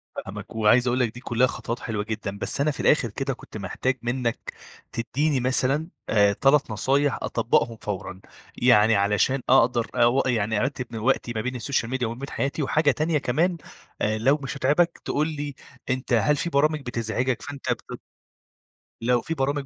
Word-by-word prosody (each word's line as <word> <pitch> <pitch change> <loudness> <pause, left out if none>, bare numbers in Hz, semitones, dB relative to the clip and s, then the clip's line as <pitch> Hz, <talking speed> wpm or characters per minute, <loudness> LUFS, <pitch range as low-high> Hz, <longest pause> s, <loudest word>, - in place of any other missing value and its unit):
فاهمك، 105 +1 -7
وعايز 110 +3 +4
أقول 125 +1 +1
لك 120 -4 +1
دي 125 - -9
كُلّها 125 0 +2
خطوت 120 -1 -5
حلوة 110 -3 -3
جدًا، 105 -2 -5
بس 125 - -2
أنا 150 +2 +2
في 145 - -9
الآخر 130 -6 +3
كده 135 +6 -3
كنت 125 - -11
محتاج 115 +6 -2
منّك 120 -1 -2 0.4
تدّيني 135 +5 0
مثلًا، 130 +5 +1 0.2
آآ 100 -2 +4
3 135 +3 +3
نصايح 135 +5 +1
أطبّقهم 115 -1 0
فورًا. 95 -2 -5 0.4
يعني 115 -3 +5
علشان 105 +7 +2
أقدر 120 -2 +4
أو 120 +3 +4
يعني 110 -4 +1
أرتّب 130 0 -2
من 115 - -5
وقتي 120 0 +1
ما 110 - -1
بين 125 +3 -3
السوشيال 125 -1 -1
ميديا 130 -2 -1
وما 115 +2 -6
بين 140 +1 -6
حياتي 140 +2 -2
وحاجة 145 +1 +3
تانية 155 +3 0
كمان 165 +7 0 0.4
أ 110 +1 +1
لو 135 +7 +3
مش 135 - -4
هتعبك، 150 +6 +2
تقول 150 +2 0
لي 145 -3 -5 0.3
أنت 130 0 -1
هل 120 +6 +3
في 170 - -2
برامج 150 0 +2
بتزعجك 120 0 -2
فأنت 140 -1 -4
بت - - -5 1.0
لو 120 +1 +2
في 165 - -3
برامج 140 -1 -1
125 Hz, 175 wpm, -25 LUFS, 115-140 Hz, 1.0 s, يعني